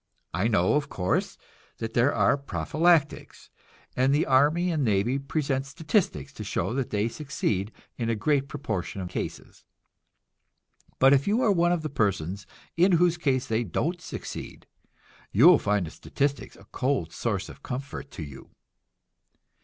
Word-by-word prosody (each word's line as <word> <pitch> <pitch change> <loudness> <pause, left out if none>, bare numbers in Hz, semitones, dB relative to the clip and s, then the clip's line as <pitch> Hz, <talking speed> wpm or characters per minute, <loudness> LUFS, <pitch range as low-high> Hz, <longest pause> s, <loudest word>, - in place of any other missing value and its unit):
I 90 +6 +1
know, 95 -5 +2
of 150 0 0
course, 90 -1 -1 0.4
that 115 0 -5
there 120 +4 +3
are - - +3
prophylactics, 145 - 0 0.4
and 130 +2 +3
the 150 - +2
army 150 +7 +3
and 155 -4 0
navy 115 +4 +1
present 140 -1 -2
statistics 150 - -1
to - - -7
show - - -2
that 130 -1 -2
they 105 +1 0
succeed 115 -7 -2 0.3
in 115 -1 -1
a 115 - +1
great 140 +5 +1
proportion 110 -10 -4
of 90 - -5
cases. - - -6 1.3
But 135 +1 +6
if 140 0 +2
you 220 +5 +2
are 215 - +4
one 175 -2 +3
of 175 -3 0
those 155 - -4
persons 100 - -1 0.3
in 180 +3 +4
whose 175 0 +3
case 130 -5 +1
they 115 +1 0
don't 165 - -2
succeed, - - -7 0.7
you 120 +9 +5
will 175 -2 +8
find 105 -3 0
the 80 - -8
statistics 140 0 -3
a - - -17
cold 125 - -1
source 100 -6 -2
of 80 - -12
comfort 135 +2 -6
to 90 - -7
you. 70 -3 -11
135 Hz, 160 wpm, -26 LUFS, 105-150 Hz, 1.3 s, will